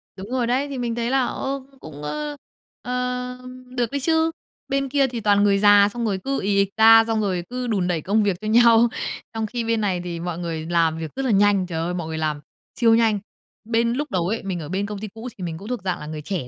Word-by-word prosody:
Đúng 195 Hz, +2 st, -9 dB
rồi 250 Hz, -2 st, 0 dB
đấy, 260 Hz, +4 st, +1 dB
thì 280 Hz, -2 st, -5 dB
mình 240 Hz, -2 st, -2 dB
thấy 235 Hz, 0 st, -1 dB
là, 265 Hz, -1 st, +3 dB
ơ, 270 Hz, +3 st, -3 dB
cũng 270 Hz, -, -23 dB
cũng, 145 Hz, -2 st, -10 dB
ơ, 295 Hz, -, -4 dB, 0.5 s
ờm, 250 Hz, 0 st, -5 dB
được 240 Hz, -3 st, 0 dB
đấy 280 Hz, -, -1 dB
chứ. 320 Hz, +3 st, +2 dB, 0.4 s
Bên 275 Hz, 0 st, -1 dB
kia 275 Hz, 0 st, +3 dB
thì 240 Hz, -2 st, -5 dB
toàn 205 Hz, 0 st, +3 dB
người 200 Hz, -1 st, +4 dB
già 205 Hz, 0 st, +6 dB
xong 240 Hz, -1 st, -2 dB
rồi 200 Hz, -3 st, -1 dB, 0.2 s
ì 200 Hz, 0 st, +1 dB
ịch 200 Hz, -1 st, +3 dB
ra, 225 Hz, 0 st, +8 dB
xong 225 Hz, -1 st, 0 dB
rồi 185 Hz, -4 st, -1 dB
cứ 250 Hz, 0 st, -4 dB
đùn 195 Hz, -5 st, 0 dB
đẩy 170 Hz, -3 st, -1 dB
công 210 Hz, +6 st, +2 dB
việc 200 Hz, -3 st, 0 dB
cho 215 Hz, -, -5 dB
nhau, 235 Hz, +1 st, +6 dB, 0.5 s
trong 225 Hz, -1 st, -2 dB
khi 235 Hz, +2 st, -3 dB
bên 230 Hz, -1 st, 0 dB
này 185 Hz, -4 st, 0 dB
thì 170 Hz, -1 st, -5 dB
mọi 170 Hz, -1 st, -4 dB
người 165 Hz, -2 st, -4 dB
làm 165 Hz, -1 st, +1 dB
việc 160 Hz, -2 st, -5 dB
rất 270 Hz, -, -2 dB
là 250 Hz, -, +1 dB
nhanh, 200 Hz, -1 st, +4 dB
trời 170 Hz, -3 st, -4 dB
ơi, 170 Hz, +2 st, -2 dB
mọi 170 Hz, -3 st, -4 dB
người 160 Hz, 0 st, -4 dB
làm 155 Hz, -2 st, -2 dB, 0.3 s
siêu 230 Hz, -2 st, +4 dB
nhanh. 225 Hz, -3 st, +3 dB, 0.5 s
Bên 230 Hz, +1 st, +1 dB
lúc 290 Hz, +4 st, -3 dB
đầu 175 Hz, -2 st, 0 dB
ấy, 220 Hz, +4 st, -2 dB
mình 190 Hz, -3 st, -3 dB
ở 150 Hz, -, -7 dB
bên 195 Hz, +3 st, -1 dB
công 205 Hz, 0 st, -6 dB
ty 215 Hz, -, -5 dB
cũ 225 Hz, +4 st, -9 dB
thì 185 Hz, -, -7 dB
mình 165 Hz, -2 st, -4 dB
cũng 200 Hz, +5 st, -10 dB
thuộc 245 Hz, -5 st, -3 dB
dạng 185 Hz, -2 st, -2 dB
là -, -, -8 dB
người 155 Hz, 0 st, -6 dB
trẻ 165 Hz, -5 st, -4 dB
215 Hz, 260 wpm, -23 LUFS, 180-245 Hz, 0.5 s, ra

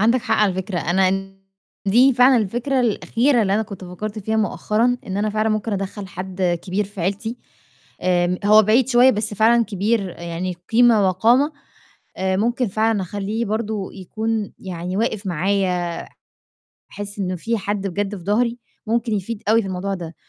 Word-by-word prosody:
عندك 230 Hz, +4 st, +3 dB
حق 220 Hz, -, +1 dB
على 210 Hz, -3 st, +3 dB
فكرة، 185 Hz, -1 st, -3 dB
أنا 185 Hz, +3 st, +2 dB
ال 195 Hz, 0 st, -3 dB, 0.5 s
دي 250 Hz, +7 st, +5 dB
فعلًا 250 Hz, +1 st, +6 dB
الفكرة 240 Hz, +5 st, 0 dB
الأخيرة 240 Hz, +2 st, +2 dB
اللي 195 Hz, -1 st, +1 dB
أنا 220 Hz, -, +2 dB
كنت 200 Hz, -3 st, -9 dB
فكّرت 210 Hz, +4 st, -6 dB
فيها 220 Hz, +2 st, -2 dB
مؤخرًا، 220 Hz, +3 st, +1 dB
إن 190 Hz, -, -3 dB
أنا 210 Hz, +1 st, 0 dB
فعلًا 215 Hz, +1 st, 0 dB
ممكن 215 Hz, 0 st, -1 dB
أدخّل 195 Hz, 0 st, -4 dB
حد 185 Hz, -1 st, -2 dB
كبير 195 Hz, +3 st, -1 dB
في 200 Hz, 0 st, -9 dB
عيلتي، 205 Hz, +7 st, -2 dB, 0.7 s
آمم، 180 Hz, 0 st, +1 dB
هو 215 Hz, +1 st, +7 dB
بعيد 225 Hz, +5 st, +3 dB
شوية 250 Hz, 0 st, +6 dB
بس 210 Hz, -2 st, -2 dB
فعلًا 230 Hz, +3 st, +4 dB
كبير 205 Hz, 0 st, 0 dB
يعني 170 Hz, +2 st, -5 dB, 0.2 s
قيمة 225 Hz, -4 st, +5 dB
وقامة، 240 Hz, -, +3 dB, 0.7 s
آآ، 190 Hz, 0 st, 0 dB
ممكن 240 Hz, +3 st, +1 dB
فعلًا 215 Hz, +1 st, +1 dB
أخلّيه 205 Hz, +5 st, -3 dB
برضو 215 Hz, -2 st, -3 dB
يكون 215 Hz, +2 st, -3 dB
يعني 180 Hz, 0 st, -5 dB
واقف 220 Hz, -2 st, -1 dB
معايا، 180 Hz, 0 st, 0 dB, 1.0 s
أحس 205 Hz, 0 st, -6 dB
إنه 185 Hz, -2 st, -2 dB
في 230 Hz, +6 st, -2 dB
حد 200 Hz, 0 st, -2 dB
بجد 200 Hz, +2 st, -2 dB
في 175 Hz, -, -11 dB
ضهري، 235 Hz, +4 st, +1 dB, 0.3 s
ممكن 230 Hz, 0 st, 0 dB
يفيد 210 Hz, +2 st, -4 dB
أوي 225 Hz, +1 st, +4 dB
في 195 Hz, -, -5 dB
الموضوع 190 Hz, +2 st, -3 dB
ده، 170 Hz, -3 st, -7 dB
205 Hz, 170 wpm, -21 LUFS, 190-225 Hz, 1.0 s, هو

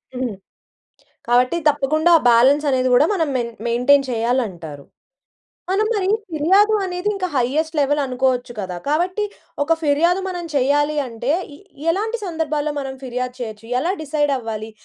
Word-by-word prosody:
హ్మ్. 250 Hz, -5 st, -3 dB, 0.9 s
కాబట్టి 250 Hz, +5 st, +3 dB
తప్పకుండా 300 Hz, +3 st, +2 dB
ఆ -, -, -7 dB
బాలన్స్ 270 Hz, +6 st, +4 dB
అనేది 255 Hz, -1 st, +1 dB
గూడా 250 Hz, +5 st, +5 dB
మనం 325 Hz, -5 st, 0 dB
మె 245 Hz, -, +1 dB, 0.2 s
మెయింటైన్ 250 Hz, +4 st, +3 dB
చేయాలంటారు. 215 Hz, -, -2 dB, 0.9 s
మనం 415 Hz, +3 st, +2 dB
మరి 390 Hz, -3 st, 0 dB, 0.2 s
ఫిర్యాదు 385 Hz, +8 st, +3 dB
అనేది 360 Hz, +1 st, -3 dB
ఇంకా 375 Hz, -2 st, -2 dB
హైజెస్ట్ 310 Hz, +6 st, 0 dB
లెవెల్ 290 Hz, +1 st, +1 dB
అనుకోవచ్చు 255 Hz, -1 st, -1 dB
కదా! 185 Hz, -2 st, -5 dB
కాబట్టి 360 Hz, +7 st, 0 dB, 0.4 s
ఒక 330 Hz, +3 st, +3 dB
ఫిర్యాదు 325 Hz, +5 st, +2 dB
మనం 355 Hz, -2 st, -5 dB
చేయాలి 290 Hz, +3 st, +2 dB
అంటే, 240 Hz, +3 st, -2 dB, 0.2 s
ఎ -, -, -18 dB, 0.3 s
ఎలాంటి 440 Hz, +6 st, -2 dB
సందర్భాల్లో 305 Hz, -3 st, -2 dB
మనం 270 Hz, -1 st, -5 dB
ఫిర్యాదు 250 Hz, 0 st, -4 dB
చేయొచ్చు? 220 Hz, -2 st, -7 dB
ఎలా 340 Hz, +7 st, 0 dB
డిసైడ్ 295 Hz, -1 st, 0 dB
అవ్వాలి? 220 Hz, -2 st, -6 dB
285 Hz, 140 wpm, -20 LUFS, 245-330 Hz, 0.9 s, గూడా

